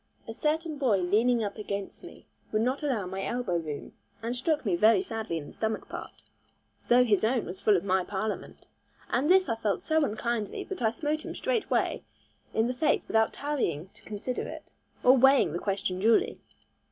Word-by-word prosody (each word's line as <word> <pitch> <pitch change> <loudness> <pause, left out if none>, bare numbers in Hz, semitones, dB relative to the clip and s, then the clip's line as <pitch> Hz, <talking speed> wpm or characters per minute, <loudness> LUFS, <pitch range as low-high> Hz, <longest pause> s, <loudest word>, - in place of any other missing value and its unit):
A 225 - -5
certain 310 +3 -1
boy 245 -8 +3
leaning 220 +6 +2
up 205 +1 -4
against 200 -1 -5
me - - -12 0.3
would 215 +1 +1
not 255 +3 0
allow 255 -10 -1
my 190 +1 -4
elbow 240 -8 -1
room, 155 -3 -6 0.3
and 235 +2 -2
struck 295 +3 0
me 190 -4 +2
very 220 - +5
sadly 225 - -3
in 150 - -6
the - - -11
stomach 220 0 -2
part, - - -9 0.6
though 245 +1 +6
his 215 -5 +2
own 235 +1 +1
was 180 +2 -7
full 210 -3 +4
of 175 - -3
my 190 -1 +2
parliament. 205 +3 -4 0.5
And 270 +6 +1
this 375 -1 +5
I 230 - 0
felt 215 -3 -1
so 315 -1 +2
unkindly, 220 -2 -2
that 385 - -7
I 225 - +4
smote 300 +7 -2
him - - -6
straightway - - 0 0.5
in 220 - +1
the 250 - -1
face 275 +5 +1
without 220 0 +2
tarrying 195 - -2
to - - -21
consider 215 +4 -4
it, - - -8 0.4
or 255 +1 +7
weighing 265 - +5
the 175 - -2
question 190 -2 -2
duly. 225 +3 +3
225 Hz, 190 wpm, -28 LUFS, 200-265 Hz, 0.6 s, or